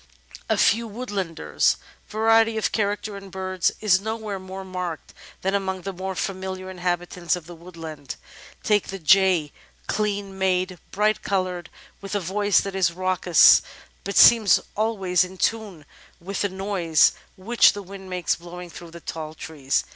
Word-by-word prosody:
A - - +2
Few 230 +3 +3
Woodlanders 200 - -1 0.3
Variety 225 +1 +3
of 220 - 0
character 205 0 -1
in 195 0 -11
birds 185 -1 -1
is 195 -3 +4
nowhere 220 -2 -4
more 190 +1 -8
marked 180 -3 -5 0.3
than 190 +1 0
among 190 -2 -2
the 195 - -4
more 190 +1 -5
familiar 190 0 -4
inhabitants 175 -1 -2
of 175 -3 -9
the 175 - -10
woodland. 165 -4 -9 0.5
Take 210 -2 +2
the 195 - -5
Jay 185 -3 +3 0.2
— - - -35
clean 200 -2 -2
made, 185 -1 0
bright 210 +2 +1
coloured, 185 -3 -2 0.3
with 195 +1 -5
a - - +2
voice 200 +1 +2
that 195 - -5
is 185 -3 +2
raucous 180 -1 +5 0.4
but 200 - -3
seems 225 -4 +7 0.2
always 195 -5 +1
in 185 +1 -8
tune 205 -8 -2 0.3
with 195 +3 -4
the 205 - +1
noise 190 -5 +2 0.3
which 225 +6 +4
the 205 0 -7
wind 190 0 -10
makes 180 -1 0
blowing 175 0 -10
through 170 0 -10
the 170 +1 -12
tall 155 -1 -6
trees. 145 -4 -2
190 Hz, 155 wpm, -24 LUFS, 175-200 Hz, 0.5 s, seems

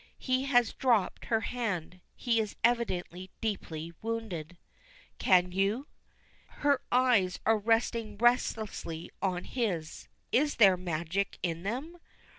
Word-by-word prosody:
He 260 0 0
has 245 -5 +3
dropped 235 -7 +1
her 225 -1 +1
hand; 200 -8 -3 0.2
he 235 -2 +1
is 215 -2 -2
evidently 190 -6 0
deeply 170 -6 -4
wounded. 205 -8 -4 0.6
"Can 180 -1 +4
you?" 200 +8 0 0.6
Her 285 -3 +1
eyes 245 -8 +3
are 220 0 +4
resting 225 -1 0
relentlessly 220 -8 0
on 180 -2 -1
his. 185 -11 -3 0.2
Is 290 +3 +2
there 195 -5 +7
magic 175 +2 -2
in 165 -2 -1
them? 265 - -4
215 Hz, 115 wpm, -30 LUFS, 180-240 Hz, 0.6 s, there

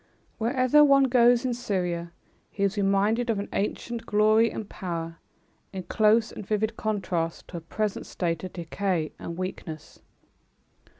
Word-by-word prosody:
Wherever 255 +5 +4
one 275 -1 +6
goes 245 -1 +4
in 250 - 0
Syria, 180 -8 -2 0.4
he 200 - -3
is 200 +1 +1
reminded 205 +4 +1
of 225 - +1
an 200 - -4
ancient 230 +3 -2
glory 215 +2 +4
and 215 - -6
power, 165 -4 -5 0.5
in 190 -1 -5
close 215 +3 +3
and - - -8
vivid 215 +2 -1
contrast 185 -7 -2
to 175 - -6
a - - -6
present 210 +5 -3
state 170 -2 -2
of 185 - -5
decay 170 -1 -2
and 170 - -6
weakness. 175 -4 -6
205 Hz, 145 wpm, -26 LUFS, 180-230 Hz, 0.5 s, one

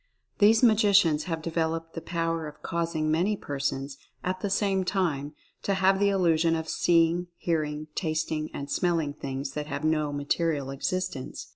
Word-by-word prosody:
These 220 +3 +5
magicians 200 -9 +5
have 165 -2 -3
developed 165 0 -2
the 165 - -5
power 165 -1 -2
of 150 - -12
causing 165 -2 -1
many 185 +6 +1
persons, 140 -2 -3 0.3
at 185 +1 -2
the 200 - -2
same 195 -1 +1
time, 155 -6 -1 0.3
to 200 - 0
have 190 0 +3
the 200 0 +4
illusion 165 -4 +3
of 160 0 -3
seeing, 170 +1 +2
hearing, 155 -2 -1
tasting 155 -2 -2
and 140 - -6
smelling 165 -3 0
things 135 -1 -5
that 150 +1 -4
have 140 0 -4
no 155 -2 +1
material 145 0 -1
existence. 180 0 -3
165 Hz, 155 wpm, -27 LUFS, 150-185 Hz, 0.3 s, These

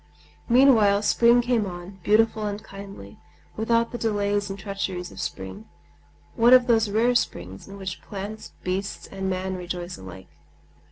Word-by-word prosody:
Meanwhile 230 -5 +5
spring 235 +3 +5
came 235 -4 +1
on, 180 +2 -9
beautiful 215 +2 +2
and 205 +1 -5
kindly, 195 - -11 0.4
without 230 +1 +1
the 240 - -5
delays 205 -2 0
and 195 - -5
treacheries 195 -3 -4
of - - -7
spring,—one 220 - -2
of 250 -1 +5
those 225 -3 +3
rare 230 +4 +2
springs 95 - -2
in 195 - -10
which 190 -1 -6
plants, 205 +1 -7
beasts, 190 +2 -3
and 190 -1 -4
man 190 0 -2
rejoice 180 0 -5
alike. 95 0 -11
200 Hz, 145 wpm, -25 LUFS, 185-225 Hz, 0.4 s, Meanwhile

